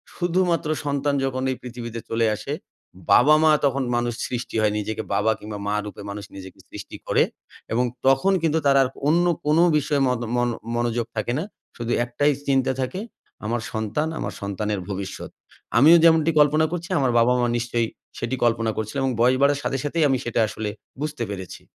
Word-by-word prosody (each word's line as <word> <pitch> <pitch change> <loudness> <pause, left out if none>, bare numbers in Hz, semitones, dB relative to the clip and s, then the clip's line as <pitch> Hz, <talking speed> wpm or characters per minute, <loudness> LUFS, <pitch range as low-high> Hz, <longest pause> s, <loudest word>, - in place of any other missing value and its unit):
শুধুমাত্র 175 -2 0 0.2
সন্তান 140 0 0
যখন 130 -1 -2
এই 130 - -2
পৃথিবীতে 120 -2 -7
চলে 115 0 +1
আসে, - - -5 0.6
বাবা 150 +5 +7
মা 155 - +6
তখন 135 0 +1
মানুষ 120 0 0
সৃষ্টি 120 -1 -5
হয় 105 -1 +2
নিজেকে 110 +1 -3
বাবা 105 +2 +2
কিংবা 105 -1 -7
মা 105 - 0
রূপে 105 0 -8
মানুষ 100 -1 -6
নিজেকে 95 -1 -10
সৃষ্টি - - -9
করে। - - +4 0.5
এবং 125 +2 +2 0.2
তখন 135 +9 +4
কিন্তু 160 -1 +2
তার 140 -1 +5
আর 135 - +3 0.2
অন্য 170 +3 +3 0.2
কোন 150 +1 +3 0.2
বিষয়ে 145 -1 0
মত 125 -2 0
মন 120 0 +1 0.3
মনোযোগ 120 -1 0
থাকে 110 +2 -1
না। - - -2 0.3
শুধু 120 0 -3
একটাই 145 +5 +1 0.2
চিন্তা 135 -1 +2
থাকে 130 +9 -3 0.5
আমার 115 +1 -1
সন্তান, 110 +8 -1
আমার - - -4
সন্তানের 100 +1 -2
ভবিষ্যৎ। 95 -1 -5 0.5
আমিও 160 +7 +8
যেমনটি 165 -1 +5
কল্পনা 150 +2 +4
করছি, 175 0 -4
আমার 130 -3 +2
বাবা 120 +2 +4
মা 120 - +2
নিশ্চয়ই 120 -1 -1 0.3
সেটি 120 +2 -2
কল্পনা 115 -1 +2
করছিল 110 +3 -4
এবং 135 -1 +1
বয়স 125 +2 +4
বাড়ার 140 0 +3
সাথে 135 - -1
সাথেই 160 +2 0
আমি 135 - +2
সেটা 120 - -1
আসলে 105 0 -4 0.3
বুঝতে 150 -5 -3
পেরেছি। 95 -3 -7
125 Hz, 180 wpm, -23 LUFS, 110-145 Hz, 0.6 s, আমিও